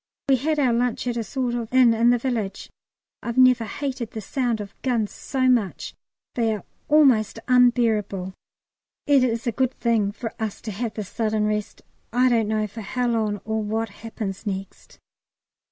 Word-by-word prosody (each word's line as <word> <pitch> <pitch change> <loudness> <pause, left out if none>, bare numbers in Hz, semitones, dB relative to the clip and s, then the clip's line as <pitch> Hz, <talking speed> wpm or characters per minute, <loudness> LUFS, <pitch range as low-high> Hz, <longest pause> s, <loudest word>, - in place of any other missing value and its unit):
We 265 - +5
had 305 +4 0
our 260 -5 +3
lunch 245 0 0
at 245 -1 -1
a 230 - -1
sort 245 +3 -2
of 235 -2 -4
inn 250 -2 +6
in 230 +1 +3
the 245 - +4
village. 230 -6 -3 0.5
I've 235 +1 -4
never 255 -2 +5
hated 255 -1 -4
the 220 - -6
sound 235 +2 -1
of 205 -1 -6
the - - -35
guns 225 -4 0
so 260 -2 -1
much; 235 -7 +1 0.4
they 225 -3 +1
are 205 - -9 0.2
almost 260 -9 +4
unbearable. 225 -7 +2 0.7
It 280 -3 +4
is 235 -2 0
a 235 - +1
good 260 +2 0
thing 225 -4 +1
for 225 +1 -6
us 215 -2 -3
to 215 - -5
have 220 +3 -4
this 210 -3 -4
sudden 215 -2 0
rest. 210 -1 -3 0.3
I 250 +2 +3
don't 230 -3 +2
know 215 0 0
for 215 +2 -8
how 245 +4 -1
long 215 -3 0
or 220 0 -1
what 220 +1 -2
happens 205 -2 -6
next. 195 -1 -6
230 Hz, 185 wpm, -24 LUFS, 215-250 Hz, 0.7 s, inn